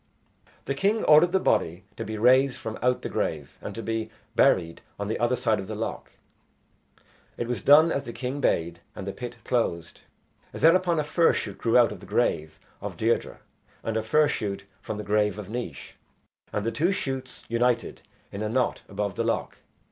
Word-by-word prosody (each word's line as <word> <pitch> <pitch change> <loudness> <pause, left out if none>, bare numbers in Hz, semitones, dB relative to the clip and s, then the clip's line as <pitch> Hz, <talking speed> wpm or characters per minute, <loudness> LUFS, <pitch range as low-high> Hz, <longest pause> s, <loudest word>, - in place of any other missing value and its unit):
The 140 - -1
king 200 +10 +1
ordered 155 +3 +6
the 190 - +3
body 90 - +1
to - - -4
be 110 +1 -5
raised 130 +3 +4
from 110 -1 -6
out 125 +1 +1
the - - -2
grave - - -3
and - - -6
to 115 - -5
be 115 -1 -2 0.3
buried 90 -11 +3 0.2
on 100 0 -4
the 110 - -2
other 120 +2 +2
side 115 -3 +1
of 95 - -6
the 110 - -5
loch. 110 +2 -5 1.2
It 120 - -3
was 120 -5 -2
done 155 +6 +7
as 140 - 0
the 120 - -7
king 130 +4 -4
bade, 85 -5 0 0.2
and 95 - -6
the 100 - -3
pit 120 -1 -7
closed. 85 -9 -1 0.5
Thereupon 170 0 +4
a - - +1
fir 165 +3 +3
shoot - - -4
grew 115 +1 +3
out 120 -1 +5
of - - -7
the - - -13
grave 80 0 0 0.2
of - - -6
Deirdre - - 0 0.4
and 115 - -2
a 110 - +1
fir 150 +8 +3
shoot 100 -6 -3 0.2
from 105 - -5
the 105 - -4
grave 105 0 +1
of 105 -2 -7
Naois, 120 +1 -5 0.6
and 105 0 -2
the 115 - 0
two 170 +9 +1
shoots 135 -8 -4
united 120 0 0 0.3
in 100 - -6
a 110 - -1
knot 125 +2 0
above 100 -1 -2
the - - 0
loch. - - -2
115 Hz, 195 wpm, -26 LUFS, 105-135 Hz, 1.2 s, done